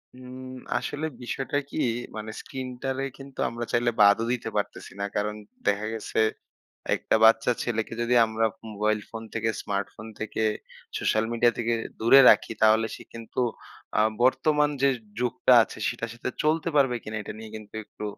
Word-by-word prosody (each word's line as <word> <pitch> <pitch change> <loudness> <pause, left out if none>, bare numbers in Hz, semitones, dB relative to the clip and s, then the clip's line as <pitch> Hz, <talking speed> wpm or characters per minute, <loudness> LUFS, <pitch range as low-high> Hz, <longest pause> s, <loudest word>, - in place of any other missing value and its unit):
হুম 125 0 -10 0.4
আসলে 145 +2 -3 0.2
বিষয়টা 135 +3 -2
কি - - -6 0.4
মানে 110 +1 -5
স্ক্রিনটারে 130 0 -4
কিন্তু 135 -1 -12
আমরা 120 0 -4
চাইলে 120 0 +2
বাদও 100 +2 +6
দিতে 125 - -3
পারতেছি - - -3
না। 100 - -1
কারণ 105 +1 -1 0.3
দেখা 105 +1 +2
গেছে 110 - -3 0.8
একটা - - 0
বাচ্চা 115 +2 +6
ছেলেকে 115 -2 -2
যদি 120 +1 +1
আমরা 110 0 0 0.3
মোবাইল 105 +1 +1
ফোন 115 -1 -7
থেকে, 110 0 0
স্মার্টফোন 100 +2 -4
থেকে, 110 0 -3 0.6
সোশ্যাল 110 +1 +1
মিডিয়া 120 0 +4
থেকে 120 0 0 0.3
দূরে 115 +5 +7
রাখি, - - +4
তাহলে 110 +1 +5
সে - - -11
কিন্তু 115 +2 -6 0.6
আ - - +5 0.2
বর্তমান 150 +3 +3
যে 140 - +5 0.3
যুগটা 125 +1 +3
আছে - - -10
সেটার 115 -1 -3
সাথে 120 +1 -4
চলতে 160 +2 +1
পারবে 135 -4 +4
কিনা 110 - -6
এটা - - -6
নিয়ে 110 0 -9
কিন্তু 105 -1 -10
একটু 105 - -11
115 Hz, 160 wpm, -26 LUFS, 110-130 Hz, 0.8 s, দূরে